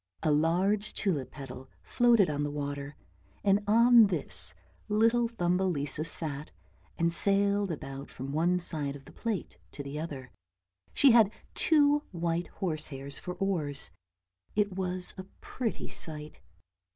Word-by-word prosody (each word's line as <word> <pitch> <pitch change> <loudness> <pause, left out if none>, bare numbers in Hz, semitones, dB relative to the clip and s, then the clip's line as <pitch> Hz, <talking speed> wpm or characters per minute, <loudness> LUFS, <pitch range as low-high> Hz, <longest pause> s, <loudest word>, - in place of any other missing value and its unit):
A 155 - +3
large 185 +7 +2
tulip 150 - -1
petal 130 -1 -9
floated 235 -6 +4
on 145 -1 -2
the 145 - -1
water, 145 0 -4 0.5
and 200 +1 +3
on 230 +1 +7
this 185 - -2 0.3
little 230 +3 +3
Thumbelisa 175 - 0
sat 150 -2 -2 0.5
and 170 0 +1
sailed 200 +1 +2
about 135 -3 -6
from 135 +2 -7
one 170 +4 +2
side 150 -5 -1
of 135 -1 -12
the - - -13
plate 225 -6 -4
to 140 - -6
the 140 +2 -5
other; 140 -6 -6 0.6
she 275 - +6
had 225 -4 +6 0.2
two 295 -2 +4
white 170 -1 -1
horsehairs 145 -6 -3
for 180 - -6
oars. 150 - -1 0.6
It 205 -1 +2
was 185 -1 -2
a - - -4 0.2
pretty 240 -4 -4
sight. 155 -1 -5
175 Hz, 135 wpm, -30 LUFS, 145-205 Hz, 0.6 s, on